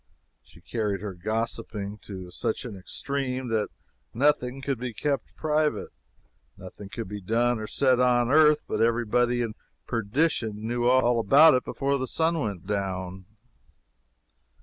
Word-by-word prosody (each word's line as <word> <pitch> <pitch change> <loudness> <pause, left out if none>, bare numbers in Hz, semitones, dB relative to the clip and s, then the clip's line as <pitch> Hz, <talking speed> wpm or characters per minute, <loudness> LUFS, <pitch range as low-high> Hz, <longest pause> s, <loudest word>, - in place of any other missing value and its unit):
She 75 +6 -20
carried 105 0 -2
her 105 -2 -5
gossiping 105 +1 -3
to 95 -3 -9
such 115 +5 -2
an 115 -5 -6
extreme 130 +6 -3
that 110 -2 0 0.5
nothing 135 -1 +2
could 135 -2 -2
be 125 -1 -4
kept 145 +2 -2
private 155 -1 0 0.7
nothing 95 +2 -10
could 115 0 -5
be 105 +1 -6
done 115 +4 +1
or 110 - -5
said 130 0 +2
on 125 -1 +3
earth 150 0 +5
but - - -1
every 115 +1 +2
body 120 +2 +2
in 115 -2 -4 0.3
perdition 115 -2 -1
knew 120 +1 -1
all 125 -2 +4
about 140 +9 +7
it 125 - +2
before 140 0 -1
the 130 - -2
sun 165 +3 +1
went 100 - -4
down. 95 -2 -3
120 Hz, 150 wpm, -26 LUFS, 105-130 Hz, 0.7 s, about